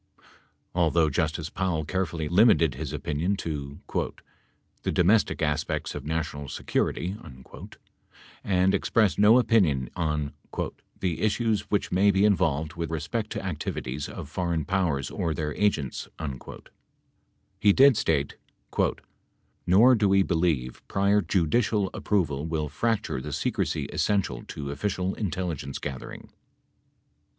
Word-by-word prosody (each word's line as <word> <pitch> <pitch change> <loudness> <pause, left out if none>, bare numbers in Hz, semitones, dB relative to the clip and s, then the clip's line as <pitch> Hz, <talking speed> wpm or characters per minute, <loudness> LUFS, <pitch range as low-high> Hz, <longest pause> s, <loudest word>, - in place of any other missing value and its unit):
Although 85 -2 +3
Justice 80 +3 -1
Powell 90 -5 -1
carefully 80 -1 -2
limited 90 - +5
his 75 +1 -5
opinion 80 +5 -1
to 75 -5 -5 1.0
"the - - -1
domestic 95 0 +3
aspects 75 +1 -1
of 75 -2 -7
national 75 -2 -3
security" 90 +3 -1 1.3
and 95 0 +3
expressed 105 +1 +2
no 105 +4 +7
opinion 95 - +2
on 75 -4 -1 0.7
"the 90 -4 -1
issues 110 -1 0
which 105 - 0
may 95 +3 +4
be 100 +1 +4
involved 80 -6 +1
with 85 -1 -4
respect 85 +8 -3
to - - -4
activities 75 -5 -4
of - - -7
foreign 85 0 -2
powers 85 -7 0
or 80 -2 -2
their 75 -2 -2
agents," 80 -10 0 1.5
he 105 - +5
did 135 +4 +6
state: 80 -9 0 1.3
"Nor 110 +9 +7
do 105 -4 +3
we 95 0 +5
believe 80 -9 0
prior 100 +1 +2
judicial 95 +3 +1
ap - - -8
proval 80 -8 0
will 80 -2 -2
fracture 110 - -1
the - - -6
secrecy - - -1
essential 95 -12 -1
to 70 -1 -6
official 95 +3 -2
intelligence 85 -7 -3
gather 70 -3 -6
ing. - - -11
85 Hz, 125 wpm, -26 LUFS, 75-100 Hz, 1.5 s, no